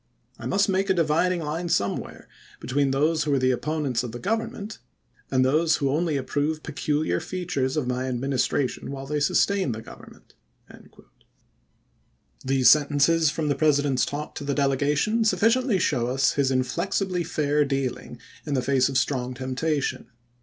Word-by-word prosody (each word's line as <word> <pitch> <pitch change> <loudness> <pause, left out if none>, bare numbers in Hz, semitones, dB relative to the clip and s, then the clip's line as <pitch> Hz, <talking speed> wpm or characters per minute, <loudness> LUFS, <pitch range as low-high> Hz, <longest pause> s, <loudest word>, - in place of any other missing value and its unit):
I - - -5
must 200 +1 +2
make 195 0 0
a 190 - +3
dividing 170 +2 +1
line 165 +4 -3
somewhere 100 -11 -2 0.3
between 140 +1 0
those 150 +4 +1
who 150 - 0
are - - +2
the 130 0 +2
opponents 135 -1 -1
of 125 -2 -5
the 120 - -6
Government, 220 - -3 0.5
and 130 -1 +2
those 155 +4 +3
who 140 -2 0
only 155 0 0
approve 145 +3 -2
peculiar 150 - -1
features 165 -7 -3
of 150 - 0
my 125 +1 -2
Administration 130 +1 -1
while 135 0 -6
they 150 +2 -2
sustain 185 - +1
the 110 - -7
Govern - - -13 0.5
Diary. - - -16
ment." - - -29 1.5
These 130 -1 +2
sentences 150 +2 +4
from 155 +1 -2
the 145 - +2
President's 145 -2 +2
talk 150 +1 -4
to - - -7
the 140 -1 -2
delegation 145 - +1
sufficiently 225 +3 +2
show 130 -9 0
us 130 +2 +2
his 140 -2 +1
inflexibly 180 +8 -1
fair 150 -2 +1
dealing 135 -3 -3 0.2
in 145 - -2
the 130 - 0
face 130 0 +2
of 135 - 0
strong 130 -2 -1
temptation. 130 +1 -2
145 Hz, 160 wpm, -25 LUFS, 130-165 Hz, 1.5 s, sentences